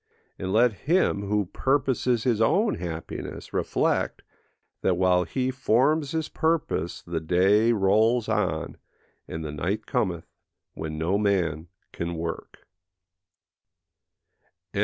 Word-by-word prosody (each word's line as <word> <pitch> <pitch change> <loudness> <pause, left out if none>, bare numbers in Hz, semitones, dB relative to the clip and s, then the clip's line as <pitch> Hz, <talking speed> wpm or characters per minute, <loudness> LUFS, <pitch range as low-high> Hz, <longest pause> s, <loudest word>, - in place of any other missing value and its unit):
And 95 0 -3
let 115 +3 +4 0.2
him, 175 - +3
who 105 0 +1
purposes 130 0 0
his 115 -3 +1
own 205 - +3
happiness, 80 -2 -6
reflect, - - 0 0.6
that 90 -2 +1
while 90 -1 +3
he 130 -1 -1
forms 135 +4 +2
his 160 +1 -2
purpose 160 - -1
the 85 -1 -3
day 95 +8 +3
rolls 110 +3 +3
on, 85 -7 -1 0.5
and 80 0 -5
the 75 - -4
night 95 +9 -2
cometh 85 -5 -1 0.5
when 80 -1 -5
no 85 +6 +1
man 90 -6 0 0.3
can 85 0 -3
work. 80 0 -6 2.1
No. - - -2
100 Hz, 115 wpm, -26 LUFS, 85-125 Hz, 2.1 s, let